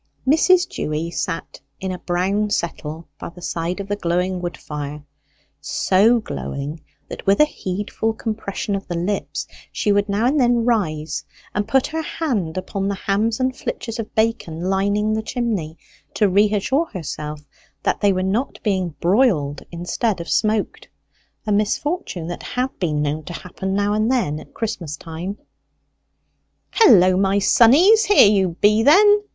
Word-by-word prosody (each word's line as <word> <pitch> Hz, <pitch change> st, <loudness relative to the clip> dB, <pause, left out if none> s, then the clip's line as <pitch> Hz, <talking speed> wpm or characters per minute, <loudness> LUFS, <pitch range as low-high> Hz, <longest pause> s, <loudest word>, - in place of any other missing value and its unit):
Mrs. 355 Hz, +5 st, +4 dB
Dewy 155 Hz, +2 st, -3 dB
sat 165 Hz, -, -4 dB, 0.2 s
in 190 Hz, 0 st, -3 dB
a 180 Hz, -, -5 dB
brown 195 Hz, +4 st, 0 dB
settle 165 Hz, -4 st, -3 dB
by -, -, -6 dB
the 175 Hz, +1 st, -14 dB
side 170 Hz, +3 st, -3 dB
of 200 Hz, -, -5 dB
the 205 Hz, -, -1 dB
glowing 180 Hz, 0 st, -1 dB
wood 175 Hz, -1 st, -4 dB
fire 150 Hz, 0 st, -6 dB, 0.6 s
so 215 Hz, +6 st, +3 dB
glowing 150 Hz, -7 st, -5 dB, 0.3 s
that -, -, -9 dB
with 195 Hz, -, +4 dB
a 300 Hz, -, +7 dB
heedful 205 Hz, -3 st, -3 dB
compression 215 Hz, -2 st, -4 dB
of 195 Hz, -, -5 dB
the 175 Hz, -, -3 dB
lips 195 Hz, +4 st, -2 dB, 0.3 s
she 210 Hz, -, 0 dB
would 205 Hz, 0 st, +2 dB
now 205 Hz, +3 st, +1 dB
and 285 Hz, +4 st, +2 dB
then 240 Hz, -2 st, +3 dB
rise 160 Hz, -10 st, -1 dB, 0.3 s
and 205 Hz, 0 st, -1 dB
put 265 Hz, -1 st, +3 dB
her 320 Hz, +1 st, -3 dB
hand 225 Hz, -, -2 dB
upon 195 Hz, +1 st, -3 dB
the 200 Hz, -, -1 dB
hams 210 Hz, +4 st, 0 dB
and 255 Hz, 0 st, 0 dB
flitches 230 Hz, -2 st, -5 dB
of 220 Hz, -, -6 dB
bacon 220 Hz, -7 st, 0 dB
lining 200 Hz, +3 st, +1 dB
the 220 Hz, -, 0 dB
chimney, 215 Hz, -9 st, -3 dB, 0.4 s
to 210 Hz, -, +3 dB
reassure 210 Hz, -, +2 dB
herself 150 Hz, -, -6 dB, 0.4 s
that -, -, 0 dB
they 205 Hz, -1 st, +4 dB
were 185 Hz, -1 st, 0 dB
not 210 Hz, +8 st, -1 dB
being 185 Hz, -6 st, -1 dB
broiled 170 Hz, -, +2 dB
instead 180 Hz, +5 st, -2 dB
of 170 Hz, -, -6 dB
smoked 215 Hz, -1 st, 0 dB, 0.6 s
a 215 Hz, -, -1 dB
misfortune 210 Hz, -, -1 dB
that 175 Hz, +1 st, -6 dB
had 250 Hz, +1 st, -2 dB
been 150 Hz, -5 st, 0 dB
known 150 Hz, +2 st, -2 dB
to 175 Hz, -, -8 dB
happen 190 Hz, +3 st, -4 dB
now 205 Hz, +1 st, +1 dB
and 215 Hz, +3 st, +1 dB
then 155 Hz, -, 0 dB
at -, -, -15 dB
Christmas 170 Hz, -9 st, -4 dB
time. 170 Hz, +6 st, -6 dB, 1.3 s
"Hullo, 185 Hz, -, +6 dB
my 195 Hz, +1 st, +2 dB
sonnies, 295 Hz, -, +6 dB
here 410 Hz, -, +7 dB
you 190 Hz, -4 st, +2 dB
be, 210 Hz, +2 st, +5 dB
then!" 410 Hz, -, +6 dB
200 Hz, 160 wpm, -21 LUFS, 175-225 Hz, 1.3 s, a